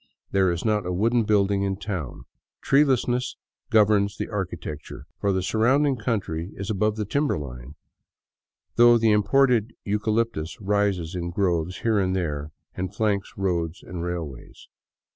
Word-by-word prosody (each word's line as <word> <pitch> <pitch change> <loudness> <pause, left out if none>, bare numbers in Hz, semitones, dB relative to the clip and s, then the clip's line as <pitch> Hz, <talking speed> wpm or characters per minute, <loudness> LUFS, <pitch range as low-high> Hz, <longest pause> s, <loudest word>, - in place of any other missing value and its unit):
There 95 -2 +3
is 85 +3 -3
not 105 -2 +2
a - - -1
wooden 115 +5 +2
building 100 -2 +2
in 100 -1 0
town. 90 - -5 0.4
Treelessness 125 -4 +2 0.3
governs 105 -1 +3
the - - -4
architecture, 90 -7 -5
for 100 - +1
the 95 -1 0
surrounding 130 +8 +2
country 100 -8 -2
is 100 +2 -4
above 105 +1 +1
the 110 -1 -2
timber 140 - 0
line, 65 -1 -8 1.0
though 120 0 +7
the 115 -1 +3
imported 120 +1 +3
eucalyptus 105 -5 -1
rises 100 -4 0
in 85 -1 -3
groves 90 -1 -1
here 110 -3 +2
and 95 -1 0
there 75 -5 -2 0.2
and 95 +2 -5
flanks 105 -3 0
roads 85 -3 -1
and 90 -2 -6
rail 85 -2 -3
ways. 65 -4 -13
100 Hz, 145 wpm, -25 LUFS, 90-110 Hz, 1.0 s, though